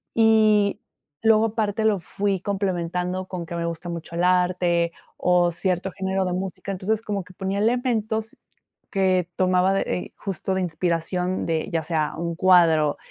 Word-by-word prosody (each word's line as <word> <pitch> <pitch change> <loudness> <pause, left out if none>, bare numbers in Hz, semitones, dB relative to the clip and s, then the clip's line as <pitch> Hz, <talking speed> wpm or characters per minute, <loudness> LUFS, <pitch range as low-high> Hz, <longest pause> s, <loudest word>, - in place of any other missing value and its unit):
y 215 -2 +4 0.4
luego, 220 0 +5
aparte, 220 -1 -1
lo 205 -3 +3
fui 195 +3 -2
complementando 185 -2 -2
con 180 -3 -5
que 165 - -8
me 170 0 -2
gusta 170 +1 -5
mucho 170 0 -6
el 175 - 0
arte 180 -2 +2 0.2
o 180 -1 +3
cierto 185 +2 -1
género 190 0 -1
de 180 - -1
música. 190 +1 -4
Entonces, 210 +4 -1
como 200 -4 -3
que 185 - -16
ponía 195 +1 -2
elementos 225 -1 0 0.5
que 185 -4 +1
tomaba 185 +1 +3
de, 195 - +1
eh, 180 - -3
justo, 190 -1 -3
de 190 - 0
inspiración 180 +2 -1
de, 160 -1 -1
ya 165 -1 0
sea 155 -1 -1
un 170 +1 -2
cuadro, 165 -5 +4
185 Hz, 160 wpm, -24 LUFS, 175-200 Hz, 0.5 s, luego